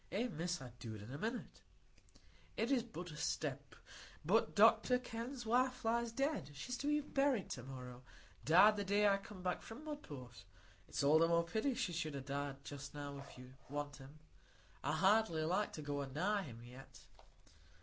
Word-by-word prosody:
"Eh, 215 +7 0
Miss, 175 -2 -2
I'd 125 -3 -11
do 115 -2 -6
it 105 - -9
in 110 - -9
a - - -4
minute,—it 230 - -7
is 265 -3 +4
but 180 -7 -7
a - - -8
step,—but - - -2
Dr 250 - +6
Kenn's 245 +1 -5
wife 250 +2 +2
lies 235 +1 +1
dead; 270 - -1
she's 250 - -4
to 285 - -3
be 295 0 +3
buried 275 -7 +1
to 125 - -4
morrow; 125 -1 -8 0.4
died 205 +7 +7
the 205 - 0
day 205 +1 +3
I 200 -1 +5
come 195 -2 -10 0.2
from 245 +8 -10
Mudport. 135 - -7 0.4
It's - - -2
all 150 +3 +6
the 165 - +5
more 170 0 +3
pity 230 +8 0
she 235 -8 -1
should 155 -3 -2
ha' 135 -1 -5
died 140 0 -3
just 140 0 -7
now, 145 -1 -5
if 140 - -11
you 125 0 -11 0.2
want 145 0 -4
him. 135 +2 -12 0.7
I 145 - 0
hardly 190 -1 +3
like 185 +6 +1
to 155 - -6
go 145 0 -2
a 140 - -3
nigh 190 +9 0
him 115 -4 -9
yet." 125 +2 -12
170 Hz, 180 wpm, -38 LUFS, 140-230 Hz, 0.7 s, died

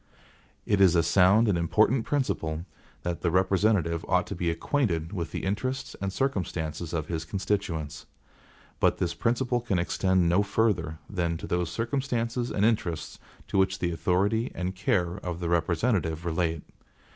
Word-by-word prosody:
It 100 -2 +2
is 90 -3 +6
a 85 - +4
sound 95 +6 +5
and 100 - +3
important 110 +8 +2
principle 85 - -1 0.4
that 85 -1 -3
the 85 - +1
representative 95 -2 +2
ought 90 -1 +2
to 100 - -6
be 85 -1 -1
acquainted 85 - -1
with 85 -5 -3
the - - -4
interests 130 +8 -2
and 100 -1 -1
circumstances 85 - -2
of 80 -3 -2
his 80 -1 -3
constituents. 85 -4 -3 0.7
But - - +3
this - - -1
principle 120 +1 0
can 110 -6 -1
extend 95 +1 +2
no 90 +4 +4
further 100 -6 0
than 85 -4 -1
to - - -7
those 90 -1 -1
circumstances 120 0 -1
and 105 - +1
interests 90 -8 -1 0.3
to - - +1
which 95 0 +2
the 85 -2 -1
authority 95 +8 +1
and 90 +1 -2
care 90 -2 0
of 90 -3 -5
the 85 -2 -2
representative 85 -1 0
relate. 80 -2 -1
90 Hz, 155 wpm, -27 LUFS, 85-105 Hz, 0.7 s, is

